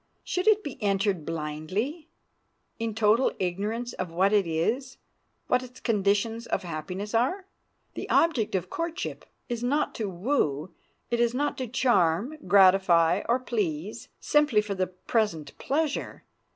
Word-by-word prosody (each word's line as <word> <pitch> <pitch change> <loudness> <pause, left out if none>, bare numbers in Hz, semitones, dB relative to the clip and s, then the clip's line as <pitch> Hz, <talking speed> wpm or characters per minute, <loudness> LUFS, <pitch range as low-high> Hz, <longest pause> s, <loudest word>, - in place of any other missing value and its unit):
Should 365 +3 -2
it 430 -1 +5
be 280 -5 -7
entered 195 -4 0
blindly, 165 - -3 0.7
in 225 -2 -2
total 220 +3 +3
ignorance 210 +7 -2
of 185 -2 -4
what 190 +4 +2
it 200 -4 +3
is, 225 +12 -1 0.5
what 250 - +2
its 255 0 -11
conditions 220 +2 0
of 195 - -1
happiness 180 +5 -5
are? 310 - +1 0.5
The - - -6
object 280 -12 +2
of 180 - -1
courtship 335 +2 -4 0.2
is 240 -1 -3
not 285 +5 +1
to 215 -3 -3
woo; 175 - -1 0.4
it 235 - +1
is 240 0 +2
not 290 +2 0
to 255 - -2
charm, 230 - +2
gratify, 185 -2 +5
or 240 - +4
please, 210 -5 -3
simply 295 -7 +3
for 210 -1 -2
the 185 -1 -1
present 185 -3 -2
pleasure. 300 +1 -2
210 Hz, 140 wpm, -27 LUFS, 185-250 Hz, 0.7 s, it